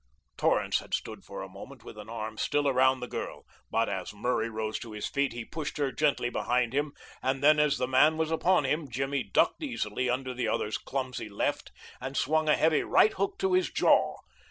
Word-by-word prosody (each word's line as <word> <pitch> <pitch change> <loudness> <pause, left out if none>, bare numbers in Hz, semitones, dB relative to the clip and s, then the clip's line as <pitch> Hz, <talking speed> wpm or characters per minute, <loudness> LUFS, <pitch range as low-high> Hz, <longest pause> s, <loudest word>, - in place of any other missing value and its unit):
Torrance - - +2
had - - -2
stood - - -6
for - - -7
a - - -7
moment - - -12
with - - -10
an 105 0 -10
arm 110 -1 -5
still 145 +6 0
around 130 -1 +3
the 125 - -4
girl; - - -6 0.2
but - - +1
as - - -4
Murray 115 +1 0
rose 110 -1 -3
to 115 -2 -9
his 105 - -4
feet 140 -1 0
he 120 0 -6
pushed 155 +3 -5
her 140 -2 0
gently 140 -5 +1
behind 120 -1 0
him, 145 +1 0 0.3
and 135 +1 -1
then 150 +1 +6
as 150 -2 +3
the 125 - -1
man 145 +5 +4
was 160 0 0
upon 175 +1 +3
him 150 +2 -1
Jimmy 135 +3 -1
ducked - - +1
easily 130 - -2
under 130 +1 -1
the 125 0 -2
other's 105 - -1
clumsy 130 -4 -4
left 100 - -2 0.3
and 135 0 -5
swung 155 +2 +2
a 150 - +6
heavy 160 -2 +3
right 215 - +4
hook 195 +1 -2
to 385 -1 0
his 370 0 +3
jaw. - - +3
135 Hz, 210 wpm, -29 LUFS, 120-150 Hz, 0.3 s, then